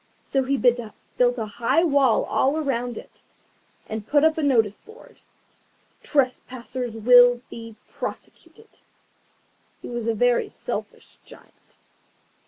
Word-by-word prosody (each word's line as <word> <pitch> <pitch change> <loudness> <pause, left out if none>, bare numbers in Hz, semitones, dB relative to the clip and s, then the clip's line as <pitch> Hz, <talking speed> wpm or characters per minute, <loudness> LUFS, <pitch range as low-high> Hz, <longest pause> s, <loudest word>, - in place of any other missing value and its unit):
So 270 - 0
he 270 +1 -1
built 245 0 0
a 225 - -3
high 230 +10 0
wall 280 -7 +3
all 270 +8 0
round 245 -5 -2
it, - - -13 0.7
and 220 -1 -6
put 290 0 +3
up 320 0 +4
a 320 - -2
notice 225 -8 +1
board. 445 +3 -17 0.8
TRESPASSERS 255 -3 -2
WILL 245 +2 +6
BE 230 -1 -9
PROSECUTED 445 - -9 1.1
He - - -7
was 240 -2 -4
a 230 - 0
very 245 +2 +1
selfish - - -7
Giant. - - -19
245 Hz, 120 wpm, -23 LUFS, 230-275 Hz, 1.1 s, WILL